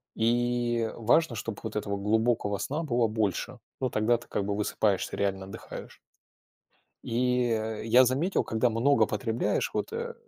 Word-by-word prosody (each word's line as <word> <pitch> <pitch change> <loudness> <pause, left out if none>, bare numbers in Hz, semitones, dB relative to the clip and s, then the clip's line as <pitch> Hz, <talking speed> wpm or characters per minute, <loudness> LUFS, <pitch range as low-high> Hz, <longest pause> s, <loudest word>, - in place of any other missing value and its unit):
И 120 0 +1
важно, 120 +4 +2
чтобы 110 -1 -5
вот - - -5
этого 105 -1 -2
глубокого 105 0 +1
сна 150 +10 -3
было 120 -6 +1
больше. 110 +3 -2 0.2
Ну 130 - 0
тогда 115 +2 +2
ты 120 - -15
как 100 - -2
бы 100 0 -1
высыпаешься, 105 -1 0
реально 95 -1 -1
отдыхаешь. 95 - -9 1.0
И 125 +1 +1
э 110 -1 -2
я 125 +3 +6
заметил, 140 +10 +1
когда 115 +2 +1
много 120 +6 +3
потребляешь, 115 -2 -1
вот - - -2
э 470 +1 -4
115 Hz, 150 wpm, -28 LUFS, 110-125 Hz, 1.0 s, я